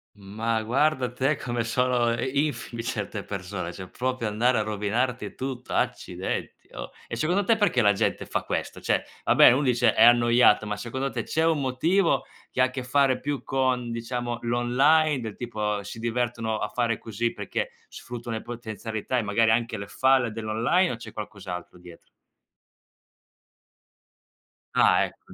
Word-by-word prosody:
Ma 110 +3 -2
guarda 130 +1 +1
te 135 +4 +1
come 120 -2 -3
sono 120 +1 +1
i 140 +5 +1
infide 120 -5 -6
certe 105 -3 -4
persone, 90 -2 -5
cioè 95 +1 -9
proprio 130 -2 -2
andare 115 +4 +2
a 110 - +1
rovinarti 110 +4 -2
tutto, 130 -1 -5
accidenti - - -3
oh! - - -6 0.2
E - - -4
secondo 180 +6 +1
te 225 +4 +3
perché 175 - +2
la 105 - +6
gente - - -1
fa - - -2
questo? - - -4
Cioè, - - +1 0.2
va - - +3
beh - - +9
uno 130 +4 +2
dice: 120 -4 +3
"È 110 - +5
annoiato", 120 -2 +5
ma 105 -1 -2
secondo 130 +6 -4
te - - -2
c'è 160 +1 0
un 160 -3 +2
motivo 165 +9 +2 0.3
che 130 - -1
ha 130 0 +3
che 130 -1 -4
fare 130 0 +2
più 145 +1 -3
con, 130 -2 0
diciamo, 120 +1 -3
l'online, 135 +5 +3
del 110 -3 -6
tipo 105 -4 -3
si 110 +3 -8
divertono 115 -1 -1
a - - -2
fare 115 -2 0
così 115 +1 -2
perché - - -3 0.2
sfruttano 120 -2 -6
le - - -6
potenzialità 115 0 -4
e - - 0
magari 110 +2 +2
anche 115 -1 0
le 100 - -6
falle 130 +1 +2
dell'online, 115 - +1
o - - -3
c'è 115 - -11
qualcos'altro 95 -5 -7
dietro? 90 -1 -15 2.6
Ah - - +4
ecco, - - -13
120 Hz, 165 wpm, -26 LUFS, 110-130 Hz, 2.6 s, beh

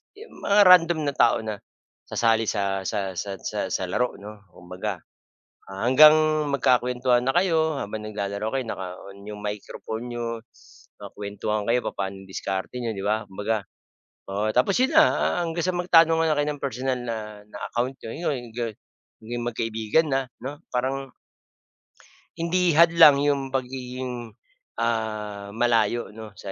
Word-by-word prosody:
yung 445 +3 -14
mga 205 +1 +5
random 175 -2 +6
na - - -4
tao - - +4
na 110 -2 -4 0.5
sasali 115 -1 +1
sa 100 -2 -1
sa 100 -3 -2
sa 100 -1 -4
sa - - -3
sa - - -1
laro, 125 +6 0
'no. 105 -1 -12
Kumbaga, 90 +1 -6 0.7
hanggang 125 +10 +6 0.4
magkakuwentuhan 125 -2 +2
na 135 - +1
kayo, 160 -4 +2
habang 105 +1 -5
naglalaro 100 +1 -3
kayo, 130 - -1
naka-on 95 +1 -7
yung 105 0 -7
microphone 110 +3 -5
n'yo, 115 -1 -4 0.6
nakakuwentuhan 105 +1 -4
kayo 125 +1 +4
papa'no 95 0 -4
diskarte 95 +4 -4
n'yo, 115 - -2
'di 95 - -4
ba? 110 +1 +1
Kumbaga, 105 +2 -2 0.7
oo, 105 +2 0
tapos 130 +10 +3
yun 265 - +2
na, 315 - +9
ah, - - +1
hanggang 165 0 -2
sa 185 - 0
magtanong 165 -2 +5
nga 155 -2 +2
kayo 145 0 +1
ng 145 - -8
personal 130 -1 -2
na 115 -2 -3 0.3
na - - -10 0.2
account 125 +3 -1
n'yo, 150 +8 -3
yung 120 -2 -8
ga 120 -2 -2 0.5
naging 120 +1 -4
magkaibigan 115 +6 0
na 135 0 +2 0.2
'no 145 +3 -6
parang 135 +2 -2 1.2
hindi 170 -1 +1
hadlang 165 -3 +7
'yung 140 -1 +2
pagiging, 125 -2 -4 0.5
ah, 110 -3 -2
malayo, 115 -2 +1
'no? 110 -1 -11
120 Hz, 145 wpm, -25 LUFS, 105-140 Hz, 1.2 s, na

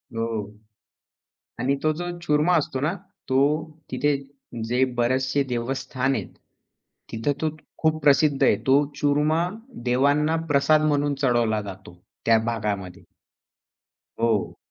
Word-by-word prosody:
हो 115 0 -1 1.3
आणि 130 +3 +1
तो 155 - +3
जो 175 +3 -4
चूरमा 155 +1 +2
असतो 140 -3 -2
ना, 155 +4 +1 0.4
तो 130 - +2 0.5
तिथे 145 0 +1 0.5
जे 125 +2 +2
बरेचसे 130 +3 +1
देवस्थान 130 +2 -1
आहेत. - - -3 0.8
तिथं 115 +5 -1
तो 160 - +1 0.3
खूप 155 0 +2
प्रसिद्ध 145 0 +4
आहे. - - +5
तो 140 +2 +5
चूरमा 150 +4 +2 0.4
देवांना 145 +5 +2 0.2
प्रसाद 145 +2 +4
म्हणून 145 0 +1
चढवला 115 -4 +2
जातो, 95 -3 -10 0.3
त्या 115 -1 +5
भागामध्ये. 105 -5 -3 1.2
हो. 115 -3 +1
135 Hz, 115 wpm, -24 LUFS, 120-150 Hz, 1.3 s, आहे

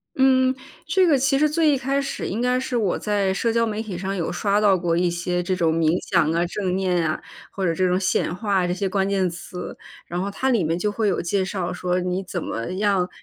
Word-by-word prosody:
嗯， 260 -1 +4 0.3
这 375 -2 +3
个 290 -4 +4
其 275 +1 +2
实 305 0 +4
最 310 -1 +3
一 275 - +2
开 270 +2 0
始， 275 - -4
应 215 +5 -2
该 250 +1 +2
是 255 -1 -3
我 210 -6 +1
在 200 -2 0
社 225 +3 0
交 230 0 +2
媒 215 -1 -3
体 210 -5 -5
上， 195 +2 -3
有 170 -4 -2
刷 200 +3 +1
到 205 -3 +4
过 170 -1 0
一 175 0 +2
些， 180 +1 -1
这 185 +1 -1
种 165 -3 +1
冥 160 -1 +2 0.2
想 155 - +3
啊、 170 +1 +1
正 185 0 -2
念 180 -3 +1
啊， 155 - -3 0.3
或 195 - -3
者 170 - +2
这 185 +3 +1
种 180 0 +2
显 185 -3 0
化 200 -2 0
啊， 175 - 0
这 175 - 0
些 195 +1 -2
关 195 0 0
键 190 -2 +1
词。 180 +1 -8 0.3
然 175 +1 -3
后 195 - -2
它 260 +6 -1
里 225 -9 +2
面 165 +2 0
就 210 +4 -1
会 215 +1 0
有 200 - +1
介 190 +2 0
绍 185 -2 -3
说， 180 0 -1
你 180 +1 -1
怎 175 -2 -3
么 115 +8 -4
样， 195 -2 +1
190 Hz, 270 characters per minute, -23 LUFS, 180-225 Hz, 0.3 s, 嗯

